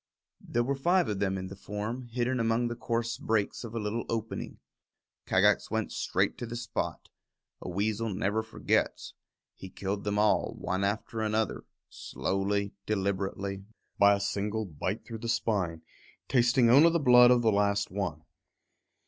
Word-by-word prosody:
There 120 - -1
were 135 +3 0
five 175 +6 +2
of 105 -2 -2
them 95 -1 0
in 95 - -4
the 95 +1 -8
form, 110 +6 -5
hidden 125 +2 -1
among 115 +1 +1
the 120 - -4
coarse 115 0 -2
brakes 110 0 -1
of 115 -1 -7
a - - -1
little 110 +2 -2
opening. 115 -1 -4 0.7
Kagax - - +3
went - - -2
straight - - 0
to 120 - -4
the 120 - -6
spot. 120 0 -4 0.5
A - - -6
weasel 105 +4 -1
never 100 +3 0
forgets. 110 0 -1 0.4
He 95 - -10
killed 100 +2 -4
them 105 0 -1
all, 105 0 +2
one 95 +2 -2
after 110 +2 -2
another, 110 0 -1 0.2
slowly, 100 +1 -2
deliberately, 100 -1 -2 0.4
by 100 0 +7
a - - -3
single 100 +2 -2
bite 90 +4 -4
through 115 -2 -7
the 115 - -5
spine, 90 -9 -1 0.4
tasting 120 0 +4
only 140 +8 +7
the 170 - +2
blood 125 -3 +7
of 125 -1 +4
the 110 - +4
last 100 -1 +1
one. 90 -6 -3
105 Hz, 160 wpm, -29 LUFS, 100-120 Hz, 0.7 s, by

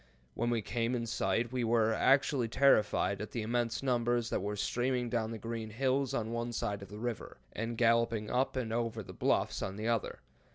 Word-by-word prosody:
When 120 +1 -1
we 115 -2 0
came 120 +2 -1
in 115 -1 -2
sight, 115 +1 0
we 125 -1 -1
were 115 -1 +3
actually 135 0 +3
terrified 105 -5 +3
at 105 - -5
the 115 - -3
immense 120 +2 -1
numbers 120 -2 +1
that - - 0
were 105 +2 -2
streaming 120 +3 -1
down 115 -2 0
the 115 - -5
green 115 0 -5
hills 130 +3 0
on 110 0 -2
one 120 0 -3
side 100 -2 -2
of 100 - -10
the 105 - -8
river, 120 0 -4 0.2
and 115 +1 -3
galloping 115 -2 +2
up 130 +4 0
and 120 -4 -2
over 115 -1 -2
the - - -10
bluffs - - 0
on 95 - -3
the 110 +2 -3
other. 115 -2 -1
115 Hz, 205 wpm, -32 LUFS, 110-120 Hz, 0.2 s, were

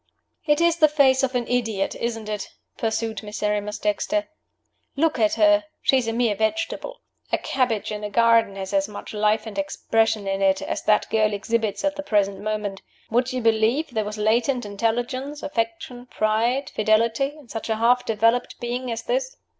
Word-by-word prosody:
"It 295 0 +3
is 340 0 +3
the 310 -2 +6
face 280 -3 +4
of 265 -1 -1
an 240 -1 -1
idiot, 225 -5 0
isn't 225 -2 -4
it?" 210 -1 -4 0.3
pursued 225 0 -2
Miserrimus 210 0 -2
Dexter! 305 +9 -1 0.7
"Look 305 -2 +1
at 215 -2 +3
her! 310 0 +4 0.2
She 265 - +4
is 240 - -4
a - - +1
mere 230 -2 +2
vegetable. 335 - -2 0.3
A - - +3
cabbage 245 -6 -1
in 210 0 -5
a 210 - -3
garden 230 -2 +3
has 190 0 -6
as 195 0 +2
much 210 +1 -9
life 215 +1 +1
and 205 -3 -5
expression 220 +1 0
in 195 0 -1
it 190 -1 +3
as - - -3
that 215 - +3
girl 215 -1 +2
exhibits 215 +3 -1
at 290 0 0
the - - -2
present 200 -7 +1
moment. 210 -2 -3 0.3
Would 245 +3 +1
you 255 0 -2
believe 225 +6 +2
there 220 -2 -1
was 210 +1 -6
latent 235 +4 +1
intelligence, 245 +7 -2
affection, 245 -1 -3
pride, 230 +5 0
fidelity, 230 +6 +1
in 295 -5 -16
such 225 0 -6
a 220 - +2
half 240 +3 +3
developed 230 +2 +1
being 245 +1 -3
as 230 0 -4
this?" - - -2
225 Hz, 180 wpm, -23 LUFS, 210-255 Hz, 0.7 s, the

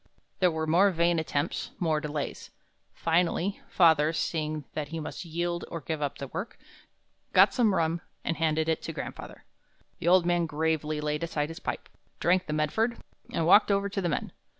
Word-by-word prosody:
There 180 - +5
were 160 -1 -2
more 175 +6 +5
vain 170 -1 +2
attempts, 145 -2 -2
more 160 -3 +1
delays. 150 -1 -4 0.4
Finally, 175 +3 0
father, 160 -3 +4
seeing 155 -2 -2
that 150 -2 -3
he 165 +2 -5
must 155 - -6
yield 170 +1 -2
or 165 - -5
give 155 +1 -4
up 145 -2 -2
the 140 - -6
work, 195 - -5 0.8
got - - +6
some 225 -6 +3
rum 165 0 0 0.2
and 165 - -2
handed 160 -1 +1
it 160 - 0
to - - -5
grandfather. - - -7 0.6
The - - -3
old 180 0 +6
man 175 -1 +2
gravely 155 -1 -1
laid 150 0 -1
aside 155 -3 -2
his 165 - -8
pipe, - - -4 0.3
drank 180 +1 +2
the - - -3
Medford, 220 +11 0 0.3
and 165 - 0
walked 205 +6 +6
over 200 0 +1
to 195 0 -2
the 175 - 0
men. 150 - -2
165 Hz, 180 wpm, -28 LUFS, 155-175 Hz, 0.8 s, got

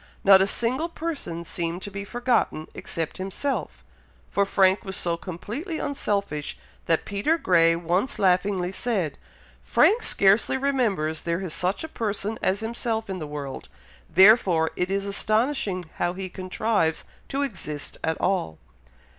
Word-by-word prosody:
Not 195 -1 +8
a 190 - +3
single 255 +10 0
person 295 - -4
seemed 170 +2 -3
to 205 - -5
be 200 +1 -5
forgotten 235 -9 0
except 165 -2 -4
himself; 195 - -3 0.5
for 200 0 +2
Frank 190 0 +3
was 190 -1 -3
so 170 -2 +1
completely 215 - -5
unselfish, 200 - -2 0.3
that 165 - +2
Peter 205 +12 +1
Grey 165 - +4
once 175 +8 0
laughingly 185 -1 +2
said, 195 -7 -2 0.4
"Frank 450 +4 +4
scarcely 200 +6 +3
remembers 225 - 0
there 170 +2 -2
is 180 -5 -3
such 185 - -1
a - - -4
person 215 -5 -3
as 195 +3 +1
himself 225 -2 -2
in 185 - -4
the 155 - -5
world, 145 -2 -6 0.4
therefore 190 -4 +6
it 180 - -1
is 195 0 -1
astonishing 210 - 0
how 175 0 0
he 190 0 -5
contrives 185 -2 -1 0.2
to 275 +1 0
exist 160 - -5
at 160 0 -1
all." 130 - 0
195 Hz, 145 wpm, -25 LUFS, 170-225 Hz, 0.5 s, Not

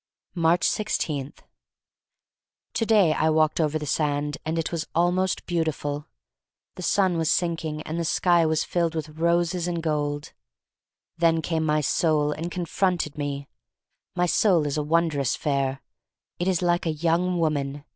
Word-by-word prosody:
Aatcb 170 +1 +2
16. 150 -9 -1 1.4
TO 225 - 0
DAY 200 -8 +5
I 160 - +1
walked 155 +1 +2
over 155 0 +1
the 150 - -5
sand, 145 0 -1
and 160 +1 -2
it 165 - -2
was 170 -1 -3
almost 180 +2 +1
beautiful. 155 -3 -2 0.7
The - - -9
sun 190 -4 +2
was 160 -1 +1
sinking 160 -3 -1
and 160 +2 -4
the - - 0
sky 170 +1 +3
was 155 0 +1
filled 170 -2 -1
with 155 -1 -3
roses 170 +1 +1
and 170 -2 -2
gold. 145 -2 -2 0.9
Then 165 -1 +3
came 160 -1 -1
my 155 -1 +2
soul 150 0 +1
and 165 +3 -4
confronted 175 -2 -1
me. 140 -1 -4 0.7
My 180 0 +2
soul 175 -3 +3
is 145 +1 -1
wondrous 150 -3 +1
fair. 135 -3 -1 0.6
It 175 - -1
is 185 -2 +1
like 175 -1 +1
a 160 - +1
young 170 +3 +1
woman. 145 -3 -1
160 Hz, 150 wpm, -25 LUFS, 150-175 Hz, 1.4 s, DAY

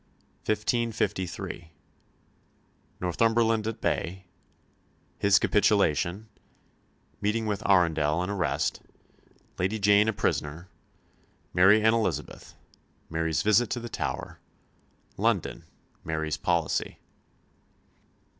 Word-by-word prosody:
CHAPTER 110 - +3
XIX 115 +3 0
1553 95 -5 -4 1.3
Northumberland 115 +4 +2
at 110 - -5
bay 95 +3 -2 0.9
His 100 0 +5
capitulation 100 -2 +2 0.9
Meeting 110 +2 0
with 105 -2 -2
Arundel, 85 -3 +3
and 90 - -3
arrest 95 -6 -1 0.8
Lady 95 +5 0
Jane 105 +1 +4
a 110 - +1
prisoner 85 -2 -2 0.8
Mary 95 +4 +5
and 110 0 +5
Elizabeth 115 -1 -3 0.6
Mary's 80 -1 0
visit 110 +2 +3
to 120 - -2
the 120 0 -7
Tower - - -4 0.8
London - - -1 0.4
Mary's 80 -1 -2
policy. 85 -3 -1
100 Hz, 90 wpm, -27 LUFS, 85-110 Hz, 1.3 s, His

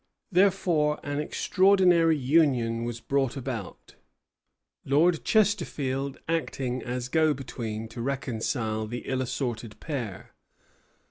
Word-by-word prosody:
Therefore 175 -5 +2
an 145 0 -3
extraordinary 180 0 +3
union 125 -5 +2
was 120 -1 -4
brought 135 +1 0
about; 120 -7 -6 0.9
Lord 160 +5 +3
Chesterfield 145 - 0
acting 135 -6 -2
as 125 +1 -4
go 155 +2 +2
between 115 -4 -5
to 120 +1 -7
reconcile 115 -4 -2
the 120 +2 -5
ill 130 -1 -1
assorted 120 -3 -4
pair. 125 - -5
135 Hz, 105 wpm, -27 LUFS, 120-160 Hz, 0.9 s, extraordinary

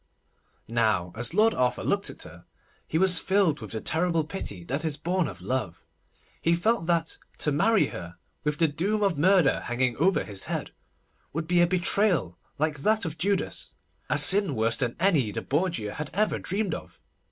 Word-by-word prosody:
Now 110 -6 0
as 120 +7 0
Lord 220 +2 +4
Arthur 125 -1 0
looked - - 0
at - - -9
her, - - -13 0.4
he 160 - -1
was 185 0 +4
filled 190 -6 +2
with - - -7
the 110 - -3
terrible 165 +4 +1
pity 150 - -6
that 135 - -3
is 155 -3 -1
born 175 +3 0
of 90 -4 -9
love. 100 -5 -3 0.6
He 170 +1 +3
felt 195 0 0
that 165 -2 0 0.2
to 150 - +1
marry 205 +9 +3
her, 85 -1 -8 0.3
with 150 0 -1
the 165 - +4
doom 195 +8 -1
of 195 -4 +2
murder 180 -3 +4
hanging 120 0 -1
over 170 +1 +2
his 100 -2 -5
head, - - -3 0.6
would 160 +2 -2
be 175 0 +3
a 175 - +5
betrayal 175 - +1 0.2
like 155 -1 -1
that 215 +7 +1
of 160 0 -5
Judas, 200 +1 -1 0.3
a - - +2
sin 195 -7 +3
worse 115 +1 +1
than 120 -2 -1
any 165 - +3
the 115 +2 -4
Borgia 150 - -1
had 150 -1 -5
ever 215 +2 +1
dreamed 195 +1 -2
of. - - -8
160 Hz, 185 wpm, -27 LUFS, 125-185 Hz, 0.6 s, a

